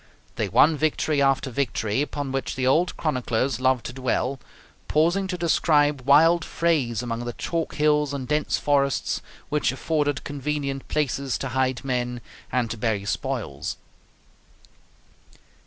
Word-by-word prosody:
They - - -1
won 155 +1 +5
victory 155 -1 +1
after 135 -1 +2
victory, 115 -2 -1
upon 145 -2 -3
which 135 0 -2
the 130 - -1
old 165 +7 +2
chroniclers 125 -4 -1
love 130 -2 +2
to 120 - -6
dwell, 130 +1 -1 0.5
pausing 175 +6 +2
to 180 -1 -3
describe 150 -4 +2
wild 165 +4 +6
frays 140 -12 0
among 120 -1 -3
the 120 - -4
chalk 165 +5 -3
hills 150 -1 +2
and 135 -3 -4
dense 150 0 +1
forests, 140 -2 +1 0.3
which 150 0 +1
afforded 145 +1 -1
convenient 140 -1 -3
places 140 -3 -1
to 135 - -4
hide 130 +1 -1
men 125 -2 -1 0.3
and 120 -3 0
to 115 - -4
bury 105 -3 -1
spoils. - - -3
140 Hz, 140 wpm, -24 LUFS, 125-150 Hz, 0.5 s, wild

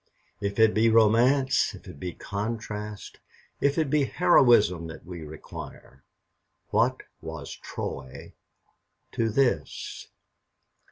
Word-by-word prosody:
If 100 0 -2
it 110 -1 +5
be 110 +1 +4
romance, 120 +5 +4
if - - -14
it - - -11
be 90 +1 -5
contrast, 105 0 -5 0.4
if 140 +2 +2
it 155 -4 +1
be 150 -2 +3
heroism 120 - +4
that 80 - -10
we 90 -1 -8
require, 75 -3 -10 0.7
what - - +2 0.2
was - - -7
Troy 65 -1 -7 0.8
to 115 -1 0
this? 115 - -1
110 Hz, 110 wpm, -27 LUFS, 90-130 Hz, 0.8 s, it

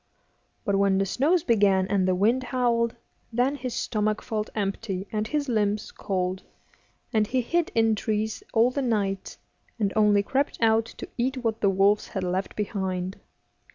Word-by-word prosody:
But 200 -1 +2
when 195 -1 +3
the 195 - +2
snows 300 - +2
began 200 -5 +3
and 195 -2 +1
the 185 - +2
wind 225 +7 +2
howled, 235 -2 +1 0.4
then 245 +4 +2
his 255 -4 -5
stomach 215 -2 -1
felt 215 -2 -3
empty 195 -1 -3
and 215 0 -1
his 295 +1 -1
limbs 210 -3 0
cold, 185 -1 -2 0.7
and 215 -2 +3
he 255 +2 +1
hid 340 +7 0
in 225 -1 +4
trees 215 +1 -2
all 235 +2 +4
the 280 - -2
night, 200 -6 -1 0.4
and 205 -4 0
only 210 -2 +4
crept 275 +7 0
out 225 0 +3
to - - -7
eat 260 +3 0
what 225 -1 -1
the 200 - +4
wolves 195 +2 +3
had 190 - -4
left 185 +2 -2
behind. 190 -3 -3
215 Hz, 165 wpm, -26 LUFS, 195-235 Hz, 0.7 s, in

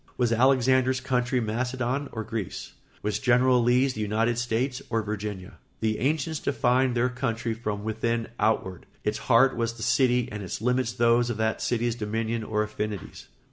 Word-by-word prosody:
Was 120 -2 +2
Alexander's 130 +1 +3
country 125 -1 0
Macedon 125 +4 -2
or 110 - -4
Greece? 110 -3 -5 0.3
Was 105 0 -1
General 125 -1 +4
Lee's 125 +3 +3
the 110 - -5
United 115 +3 0
States 125 +2 -1
or 115 -1 0
Virginia? 105 -3 -5 0.2
The 110 -1 0
ancients 150 +3 0
defined 130 -2 +1
their 120 +2 +3
country 115 -3 -2
from 105 -2 -4
within 115 +1 -1
outward; 105 -4 0 0.2
its 105 +1 -1
heart 130 +2 +4
was 115 -1 -1
the 115 -1 -8
city 125 -2 +2
and 105 0 -5
its 95 - -5
limits 125 +1 +1
those 120 +1 +3
of 120 - -2
that 110 0 0
city's 120 -1 0
dominion 115 0 -2
or 105 0 0
affinities. 105 -2 -5
115 Hz, 165 wpm, -26 LUFS, 110-125 Hz, 0.3 s, General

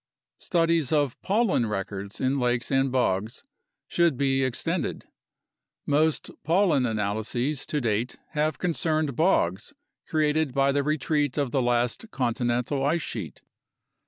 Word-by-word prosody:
Studies 165 -5 +1
of 145 -5 +1
pollen 200 - +1
records 100 0 -4
in 135 +2 +1
lakes 120 0 0
and 135 0 +2
bogs 110 - 0 0.4
should 170 -6 +2
be 135 -1 +2
extended. 130 -2 -2 0.8
Most 155 +2 +1
pollen 165 -6 +3
analyses 110 +6 -1
to 150 - -1
date 115 -1 -1
have 155 0 0
concerned 155 -5 0
bogs 105 - +1 0.3
created 155 -2 +1
by 135 0 +3
the 140 +1 +1
retreat 150 -1 0
of 140 -4 0
the 135 - +1
last 120 - 0
continental 125 - -1
ice 155 +3 +1
sheet. - - -6
135 Hz, 125 wpm, -26 LUFS, 120-155 Hz, 0.8 s, pollen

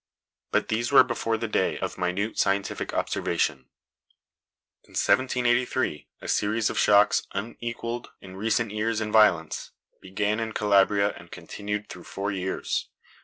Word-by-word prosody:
But - - 0
these 115 +3 -1
were 140 - +8
before 115 -2 -1
the 115 - -3
day 105 - 0
of - - -4
minute 95 +5 -2
scientific 100 0 0
observation. 80 -6 -1 1.2
In - - -21
1783, 125 - +1
a - - -8
series 110 +2 +1
of - - -2
shocks, 105 0 +4
unequalled 115 +2 -5
in 95 -1 -12
recent 110 +2 0
years 110 +1 -1
in 105 -1 -3
violence, 95 -8 +3 0.3
began 105 +3 -1
in 110 -1 -3
Calabria 100 0 +3
and - - -13
continued 105 0 -5
through 90 - -10
four 100 +1 -3
years. 95 -1 -2
105 Hz, 135 wpm, -26 LUFS, 100-115 Hz, 1.2 s, were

